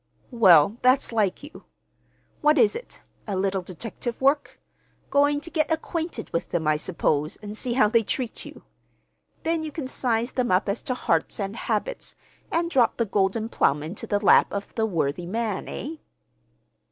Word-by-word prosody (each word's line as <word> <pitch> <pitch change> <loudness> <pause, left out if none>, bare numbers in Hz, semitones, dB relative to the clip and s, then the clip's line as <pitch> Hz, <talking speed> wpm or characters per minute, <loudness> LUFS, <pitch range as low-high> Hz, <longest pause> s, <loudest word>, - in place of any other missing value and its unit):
"Well, 200 - +6
that's 255 +1 +3
like 215 0 0
you. 295 - -12 0.8
What 300 0 +4
is 225 -5 +4
it, - - -9 0.2
a 200 - -2
little 190 0 0
detective 225 +6 -6
work? 275 +2 +1 0.5
Going 290 +1 +3
to 335 +3 -9
get 310 -1 0
acquainted 320 -5 -3
with 165 - -2
them, 160 -3 -1
I 155 - +4
suppose, 150 -2 -1
and 210 0 -9
see 240 +2 -2
how 235 -4 +4
they 230 +2 +3
treat 240 +2 -4
you. - - -12 0.8
Then 325 0 0
you 310 -1 -5
can 290 -3 -5
size 240 -2 -1
them 250 -2 -1
up 185 +3 +2
as 200 +3 -1
to 255 - +1
hearts 165 -7 0
and 200 +1 -3
habits, - - -3 0.4
and 335 +1 0
drop 245 -7 +3
the 230 - +1
golden 200 +2 0
plum 145 -9 +1
into 165 +7 -6
the 205 - +1
lap 205 - +5
of 200 0 -5
the 220 -1 0
worthy 170 -2 -1
man, 215 0 -2
eh?" 315 +4 -6
225 Hz, 175 wpm, -25 LUFS, 190-275 Hz, 0.8 s, Well